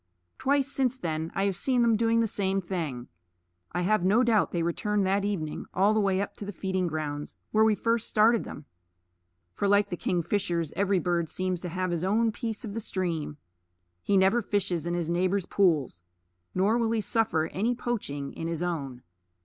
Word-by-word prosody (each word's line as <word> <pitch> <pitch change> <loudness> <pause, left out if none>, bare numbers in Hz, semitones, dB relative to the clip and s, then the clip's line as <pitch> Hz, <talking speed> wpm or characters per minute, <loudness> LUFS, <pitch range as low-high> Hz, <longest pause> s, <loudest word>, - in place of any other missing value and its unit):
Twice 280 0 +2
since 260 -2 0
then 160 -4 -3
I 195 - +1
have 195 -2 0
seen 245 +5 +1
them 230 -1 +4
do 230 +1 +2
the 230 - +3
same 195 -2 0
thing. 165 -10 -4 0.6
I 180 +1 -1
have 215 0 +2
no 210 +7 +4
doubt 225 -4 +3
they 170 -2 -1
returned 200 +4 0
that 195 +1 +1
evening 180 -7 -3
all 200 +3 +4
the 215 - +2
way 195 -2 +2
up 200 - -3
to 205 - -6
the 205 - -4
feeding 190 -1 -1
grounds 150 -2 -4
where 215 0 +4
we 220 -1 +4
first 230 +1 0
started 225 +1 +4
them; 150 - -9 0.9
for 200 - -1
like 205 +1 +3
the - - -1
kingfishers 175 -2 -1
every 200 0 +2
bird 175 -2 0
seems 185 -2 -2
to 180 - -4
have 185 +1 -2
his 170 -1 -1
own 220 +4 +2
piece 225 +1 -4
of 205 - -6
the 225 - -3
stream. 170 -8 -3 0.6
He 200 - +2
never 190 +5 +4
fishes 185 -6 -1
in 175 - -1
his 170 -2 -1
neighbor's 180 +2 +1
pools, 155 - +1 0.5
nor 205 +6 +2
will 230 -1 +1
he 225 - +1
suffer 205 -6 +1
any 225 +6 0
poaching 145 - -3
in 165 - -5
his 165 0 -2
own. 140 -8 -4
190 Hz, 195 wpm, -28 LUFS, 170-215 Hz, 0.9 s, them